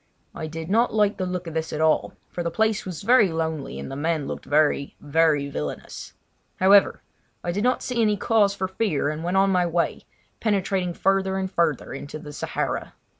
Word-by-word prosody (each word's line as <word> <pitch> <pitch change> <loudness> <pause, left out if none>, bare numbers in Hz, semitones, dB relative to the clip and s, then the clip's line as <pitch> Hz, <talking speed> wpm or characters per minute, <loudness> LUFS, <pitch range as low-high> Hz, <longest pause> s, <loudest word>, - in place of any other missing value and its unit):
I 160 - -5
did 160 +1 -6
not 230 +6 +2
like 210 -1 +2
the 185 - -2
look 180 0 -3
of 165 - -6
this 160 0 -2
at 150 - -3
all, 160 0 +2 0.2
for 175 - -4
the 170 - -1
place 220 +3 0
was 180 -1 -6
very 220 -4 +5
lonely, 160 - -3
and 70 - -6
the - - -5
men 155 0 -1
looked - - -6
very, 145 -1 +1
very 150 -1 +2
villainous. 75 - -6 0.4
However, 195 +1 +4 0.4
I 175 - -1
did 205 +4 -2
not 250 +1 +1
see 245 -2 -1
any 210 -2 +2
cause 205 -2 +2
for 190 -1 -2
fear, 190 -7 0
and 155 +1 -4
went 180 +2 0
on 195 0 +4
my 180 -2 +2
way, 170 0 -1 0.3
penetrating 195 -4 0
further 190 0 +1
and 190 -1 -2
further 165 -7 0
into 140 +2 -7
the 150 -1 -10
Sahara. - - -3
175 Hz, 200 wpm, -24 LUFS, 155-195 Hz, 0.4 s, very